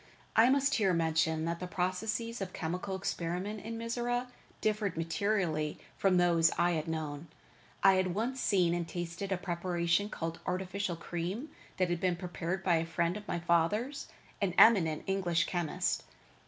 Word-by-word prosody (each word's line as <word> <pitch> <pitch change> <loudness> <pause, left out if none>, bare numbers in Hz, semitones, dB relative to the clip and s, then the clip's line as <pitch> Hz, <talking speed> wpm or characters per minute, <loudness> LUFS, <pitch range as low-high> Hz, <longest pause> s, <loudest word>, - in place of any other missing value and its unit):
I 230 +3 +7
must 280 +1 +3
here 195 -5 +3
mention 160 -1 +1
that 170 0 -2
the 180 - -4
processes 205 +6 -2
of 185 -2 -4
chemical 180 +4 -3
experiment 190 +3 -3
in 225 +1 -5
Mizora 240 +2 -2 0.3
differed 210 -5 0
materially 165 -3 0 0.2
from 190 -2 +3
those 170 -2 +4
I 175 +1 +3
had 160 -1 -1
known. 155 -1 -4 0.6
I 195 -1 +7
had 185 -1 0
once 245 +5 -1
seen 180 -4 +3
and 175 -1 -2
tasted 175 +3 -5
a 190 - +1
preparation 175 +1 0
called 165 -3 -4
artificial 185 0 -2
cream 175 - -4 0.3
that 185 -2 +1
had 175 - 0
been 185 -2 +2
prepared 175 +1 -4
by 175 -3 +3
a 160 - 0
friend 170 +2 0
of 210 -1 -8
my - - -1
fathers, 175 - +1 0.3
an 185 -3 0
eminent 170 -9 +6
English 180 -3 +1
chemist. 175 -4 -1
180 Hz, 160 wpm, -32 LUFS, 170-205 Hz, 0.6 s, I